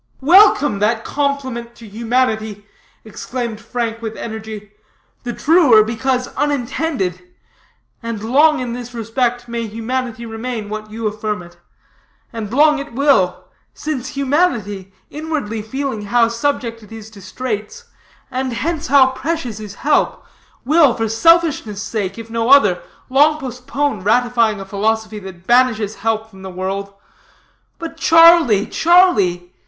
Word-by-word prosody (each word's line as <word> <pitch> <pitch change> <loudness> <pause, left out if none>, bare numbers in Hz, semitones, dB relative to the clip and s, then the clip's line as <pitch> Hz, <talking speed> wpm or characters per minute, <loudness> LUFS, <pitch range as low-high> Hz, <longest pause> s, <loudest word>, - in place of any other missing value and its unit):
"Welcome, 300 - +5
that 220 +2 +1
compliment 260 -5 -3
to 230 -2 -13
humanity," 220 -2 -1 0.4
exclaimed 230 0 -5
Frank 230 -1 -4
with 225 -1 -6
energy, 220 -2 -7 0.5
"the 245 - -4
truer 285 -6 +5
because 250 +3 -1
unintended. 265 - -2 0.8
And 230 -3 -5
long 295 +7 +4
in 245 -2 -4
this 245 0 -8
respect 240 +2 -2
may 235 -1 -4
humanity 235 +1 -4
remain 225 -1 -5
what 215 0 -6
you 225 +1 -6
affirm 210 -2 -3
it. 175 0 -16 0.8
And 220 -3 -5
long 300 +3 +4
it 280 -3 -8
will; 260 -9 +2 0.3
since 275 -5 -4
humanity, 240 - 0 0.2
inwardly 295 -8 -4
feeling 260 +1 -4
how 230 +2 +3
subject 235 -1 -2
it 215 - -16
is 220 -1 -10
to 205 -2 -14
straits, 215 - -5 0.5
and 260 -1 -2
hence 320 +5 -3
how 265 -1 +5
precious 260 -4 -4
is 210 -2 -9
help, 300 - +1 0.4
will, 300 -2 +4
for 225 - -1
selfishness' 275 - +2
sake, 200 -3 -3
if 230 -1 -8
no 230 +1 -1
other, 205 -11 +5 0.3
long 295 +4 +3
postpone 265 -1 -3
ratifying 230 0 +2
a 195 - -7
philosophy 215 +2 -2
that 185 -3 -11
banishes 230 -3 +2
help 220 -1 -1
from 195 -3 -16
the 190 - -7
world. 190 +2 -4 0.9
But 330 -1 -7
Charlie, 330 - +6
Charlie! 205 - +3
235 Hz, 135 wpm, -18 LUFS, 215-275 Hz, 0.9 s, Charlie